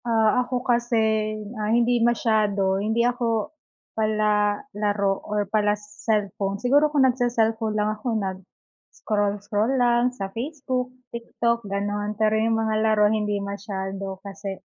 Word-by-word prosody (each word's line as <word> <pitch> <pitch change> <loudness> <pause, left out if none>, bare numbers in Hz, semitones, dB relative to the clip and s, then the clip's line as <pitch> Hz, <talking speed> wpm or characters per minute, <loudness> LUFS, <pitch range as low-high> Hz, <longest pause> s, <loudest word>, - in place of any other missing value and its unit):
Ah, 225 +1 +3
ako 250 0 -3
kasi, 240 -1 +1 0.6
ah, 210 - -1
hindi 240 +1 +3
masyado, 210 -5 +2
hindi 220 +3 +1
ako 235 -1 0 0.4
palalaro 210 -1 +1 0.2
or 210 0 0
pala-cellphone. 210 -1 -1
Siguro 280 +7 +3
kung 290 -3 +3
nagce-cellphone 225 -3 +1
lang 210 0 +1
ako, 215 +4 -8
nag-scroll-scroll 205 +3 -3
lang 240 0 +3
sa 250 -6 -5
Facebook, 255 0 -3 0.2
TikTok, 235 -1 -2
gano'n. 205 +1 -2
Pero 215 0 +2
yung 225 +1 +2
mga 220 -1 0
laro, 215 -1 +3
hindi 210 -1 0
masyado 195 -1 -5
kasi 195 0 -6
215 Hz, 120 wpm, -24 LUFS, 205-235 Hz, 0.6 s, Ah